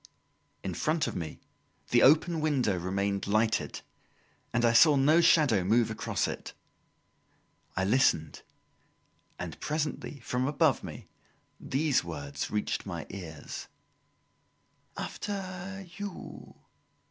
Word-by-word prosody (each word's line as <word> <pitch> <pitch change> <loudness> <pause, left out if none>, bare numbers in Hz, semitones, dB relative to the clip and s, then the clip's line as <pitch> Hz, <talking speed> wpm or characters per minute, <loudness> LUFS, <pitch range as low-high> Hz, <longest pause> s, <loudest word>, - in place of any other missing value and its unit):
In - - -3
front 155 0 0
of - - -4
me, 80 -4 -5 0.5
the - - +5
open 160 +3 +5
window 135 -10 +1
remained 100 +3 -1
lighted, 110 +2 +1 0.7
and 120 0 +2
I 115 - +4
saw 150 +5 +7
no 150 +5 +5
shadow 135 - +4
move 110 +4 +3
across 110 - -1
it. - - -6 1.2
I 95 - +1
listened, 100 -8 +2 1.0
and - - -6
presently 150 -1 -3
from 125 +3 -1
above 145 - +2
me - - -8 0.5
these 140 +1 +1
words 70 -4 -5
reached 105 -1 -1
my 85 -6 -5
ears: 80 -6 -7 1.3
"After 190 -1 -5
you!" 205 -2 -8
125 Hz, 110 wpm, -29 LUFS, 100-155 Hz, 1.3 s, saw